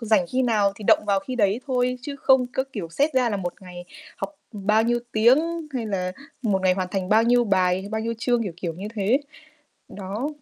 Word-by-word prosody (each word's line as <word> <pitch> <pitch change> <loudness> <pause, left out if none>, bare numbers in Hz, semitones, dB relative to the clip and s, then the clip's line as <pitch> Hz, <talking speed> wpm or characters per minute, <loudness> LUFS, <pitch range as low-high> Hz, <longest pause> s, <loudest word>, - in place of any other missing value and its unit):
rảnh 215 -6 +2
khi 260 +1 +1
nào 210 -5 +2
thì 210 - -9
động 210 - +4
vào 200 -1 +2
khi 255 +6 -6
đấy 205 +1 +2
thôi 250 -1 0
chứ 280 +1 -6
không 265 -2 +4
có, 260 +1 -2
kiểu, 185 -7 -5
xét 285 - 0
ra 250 -2 +3
là 205 - -1
1 175 -2 -4
ngày 180 -1 -9 0.3
học 300 - -5 0.2
bao 210 +2 +2
nhiêu 240 +1 +1
tiếng 235 +6 +5 0.4
hay 235 -4 -2
là 185 -3 -2 0.3
1 200 -5 +1
ngày 185 -1 +4
hoàn 185 -1 -2
thành 190 -2 -2
bao 220 +2 +5
nhiêu 240 +1 +3
bài, 185 -2 +1
bao 220 0 -2
nhiêu 230 +1 -2
chương, 240 0 +1
kiểu, 195 -6 -4
kiểu 175 -2 -4
như 195 +5 -6
thế. 215 +7 +2 0.7
Đó. 200 +7 -4
215 Hz, 225 wpm, -24 LUFS, 190-245 Hz, 0.7 s, tiếng